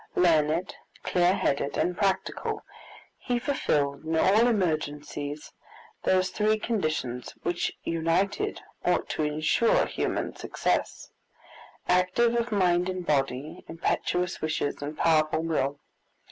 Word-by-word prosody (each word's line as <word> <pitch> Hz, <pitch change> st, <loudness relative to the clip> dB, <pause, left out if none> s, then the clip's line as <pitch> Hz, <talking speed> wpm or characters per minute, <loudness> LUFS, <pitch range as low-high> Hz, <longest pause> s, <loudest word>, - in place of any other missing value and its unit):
Learned, 165 Hz, 0 st, +3 dB, 0.3 s
clear 180 Hz, +1 st, +3 dB
headed, 140 Hz, -4 st, 0 dB
and 180 Hz, -, +1 dB
practical, 195 Hz, -1 st, -1 dB, 0.6 s
he 245 Hz, -2 st, -1 dB
fulfilled 145 Hz, -, 0 dB
in 160 Hz, +1 st, -2 dB
all 210 Hz, +8 st, +5 dB
emergencies 150 Hz, -7 st, -2 dB, 0.5 s
those 185 Hz, 0 st, +3 dB
three 215 Hz, +2 st, +2 dB
conditions 155 Hz, -, -2 dB
which 175 Hz, 0 st, -1 dB
united 165 Hz, +5 st, 0 dB, 0.2 s
ought 180 Hz, -, +1 dB
to -, -, -2 dB
insure 155 Hz, +9 st, +2 dB
human -, -, -2 dB
success -, -, -2 dB, 0.8 s
activity 185 Hz, +7 st, +3 dB
of 235 Hz, 0 st, -6 dB
mind 180 Hz, -3 st, +2 dB
and 185 Hz, -1 st, -4 dB
body, 135 Hz, -1 st, -1 dB
impetuous 180 Hz, +2 st, -1 dB
wishes, 155 Hz, -2 st, -2 dB
and 150 Hz, +1 st, -5 dB
powerful 155 Hz, -1 st, +2 dB
will. 145 Hz, -4 st, -1 dB
165 Hz, 110 wpm, -27 LUFS, 150-190 Hz, 0.8 s, all